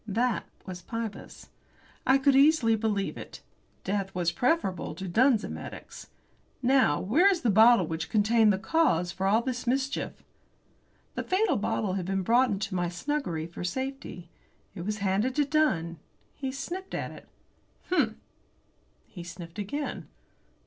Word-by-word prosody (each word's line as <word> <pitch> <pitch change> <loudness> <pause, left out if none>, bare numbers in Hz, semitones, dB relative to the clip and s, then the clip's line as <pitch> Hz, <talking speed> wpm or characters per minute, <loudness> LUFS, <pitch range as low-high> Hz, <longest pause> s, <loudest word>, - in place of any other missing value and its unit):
That 230 +3 0 0.2
was 180 -2 -7
Pybus. 225 +2 -7 0.6
I 265 - +6
could 275 0 +3
easily 275 -5 +5
believe 210 -2 -1
it. - - -10 0.4
Death 195 -1 -2
was 175 -2 +1
preferable 245 - 0
to 190 +3 -6
Dunn's 230 +4 +3
emetics. - - -8 0.6
"Now, 255 - +4
where 305 - +4
is 370 -4 +1
the 230 - +2
bottle 220 -1 +6
which 160 0 -4
contained 220 0 +4
the 190 - +1
cause 200 - +1
of 190 - -12
all 205 +4 +3
the 250 -1 -3
mischief?" 265 +2 -1 0.9
The - - -3
fatal 375 -4 +1
bottle 205 -3 -1
had 185 -2 -3
been 195 0 -1
brought 245 +6 +4
into 205 -1 -2
my 175 -1 0
snuggery 180 - -3
for 170 +1 -8
safety. 260 -4 -5 0.5
It 175 - -7
was 210 0 -1
handed 205 +7 +1
to 295 - +3
Dunn. 175 - +1 0.3
He 265 -2 -4
sniffed 365 +8 -6
at - - -3
it. - - -13 0.6
"Hum!" 365 - +2 0.9
He 175 - -10
sniffed 170 +1 -9
again. 285 +9 -4
220 Hz, 150 wpm, -28 LUFS, 185-265 Hz, 0.9 s, I